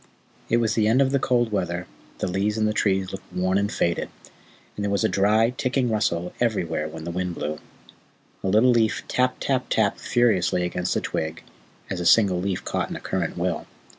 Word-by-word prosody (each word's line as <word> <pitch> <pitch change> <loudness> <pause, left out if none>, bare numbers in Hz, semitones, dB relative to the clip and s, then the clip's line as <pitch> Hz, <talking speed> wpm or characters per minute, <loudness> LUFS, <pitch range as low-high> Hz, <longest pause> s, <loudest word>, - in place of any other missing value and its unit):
It 115 - +3
was 115 -2 +1
the 110 -2 +2
end 115 +4 +4
of 135 -1 +3
the 140 - +2
cold 120 -3 +1
weather, 90 -3 -2 0.3
the - - -2
leaves 100 +4 0
and 110 -1 +2
the 105 - 0
trees 95 -3 +1
looked 95 - -9
worn 95 +2 +1
and 100 +1 -1
faded, 85 - 0 0.7
and 105 - -4
there 100 - 0
was 100 0 +1
a - - +4
dry, 110 +4 +3
ticking 125 -1 0
rustle 90 -5 0
everywhere 85 -10 0
when 80 +1 -8
the 85 - -4
wind 90 0 -3
blew. 75 0 -4 0.8
A - - -1
little 110 +6 +5
leaf 115 -2 +2
tap 125 0 +1
tap 130 -2 0
tapped 105 -3 +1
furiously 110 -7 +2
against 90 0 -1
a - - +1
twig, 80 0 -3 0.5
as 95 - -2
a 90 - 0
single 95 -2 +5
leaf 95 -1 -2
caught - - -2
in - - -5
a - - -5
current 90 -3 -3
will. 85 0 -2
100 Hz, 205 wpm, -24 LUFS, 90-115 Hz, 0.8 s, little